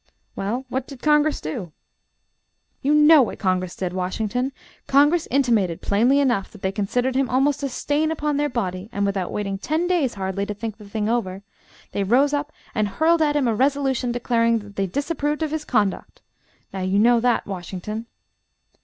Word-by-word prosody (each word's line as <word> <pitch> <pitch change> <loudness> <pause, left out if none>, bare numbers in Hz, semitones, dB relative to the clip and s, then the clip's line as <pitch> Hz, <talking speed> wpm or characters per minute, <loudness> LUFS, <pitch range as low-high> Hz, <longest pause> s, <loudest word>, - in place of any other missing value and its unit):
"Well, 235 +7 -3
what 255 +1 -3
did 275 -3 -11
Congress 300 0 +3
do?" 155 +2 -6 1.1
"You 290 +2 +2
know 300 0 +7
what 245 - -1
Congress 185 -2 -1
did, 180 -2 -3
Washington. 215 +8 -2 0.4
Congress 295 +4 +4
intimated 230 -11 +1
plainly 240 +8 +3
enough, 240 -8 +1
that 210 - -14
they 190 - +1
considered 245 +6 -1
him 265 -1 +1
almost 270 +4 +2
a 280 - -1
stain 290 +4 0
upon 300 -2 -1
their 295 0 +1
body; 190 -5 -3
and 200 -2 -1
without 195 -2 -2
waiting 195 -2 -3
ten 310 - -1
days, 340 -10 +1
hardly, 195 +1 -3
to 210 - -4
think 215 0 -5
the 210 -2 -13
thing 210 0 -2
over, 200 -5 -1 0.5
they 200 - -1
rose 265 +8 +3
up 290 +1 -1 0.2
and 215 -3 +1
hurled 320 - +2
at 295 -1 +2
him 280 -4 +2
a 230 - +2
resolution 265 0 +1
declaring 230 -1 +1
that 205 -2 -10
they 195 -1 0
disapproved 295 - -2
of 310 - -2
his 315 -1 -3
conduct! 205 -5 -1 0.5
Now 190 - -4
you 185 +2 0
know 235 +3 +5
that, 240 0 +1
Washington." 195 +4 -6
240 Hz, 180 wpm, -23 LUFS, 200-285 Hz, 1.1 s, know